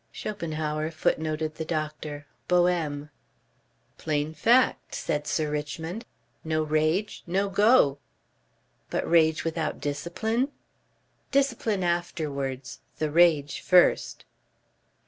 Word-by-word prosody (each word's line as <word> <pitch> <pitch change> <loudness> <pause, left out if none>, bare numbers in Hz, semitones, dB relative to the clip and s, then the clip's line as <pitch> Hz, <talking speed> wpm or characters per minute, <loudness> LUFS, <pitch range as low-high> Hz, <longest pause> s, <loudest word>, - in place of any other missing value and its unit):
"Schopenhauer," 155 -6 -3
footnoted 155 -1 -1
the 160 - -5
doctor. 155 -2 -4 0.2
"Boehme." 165 -5 +1 0.9
"Plain 150 0 -1
fact," 235 - +2
said 150 0 -2
Sir 155 -2 0
Richmond. 160 +7 -4 0.4
"No 155 0 0
Rage 155 +7 0
no 195 +3 0
Go." 200 - +4 0.9
"But - - -2
rage 160 -1 +4
without 165 -1 -2
discipline?" 220 - -1 0.8
"Discipline 250 -8 +1
afterwards. 150 -7 -2 0.2
The 155 -1 -1
rage 155 -4 +3
first." 180 -1 +3
160 Hz, 90 wpm, -27 LUFS, 150-180 Hz, 0.9 s, Go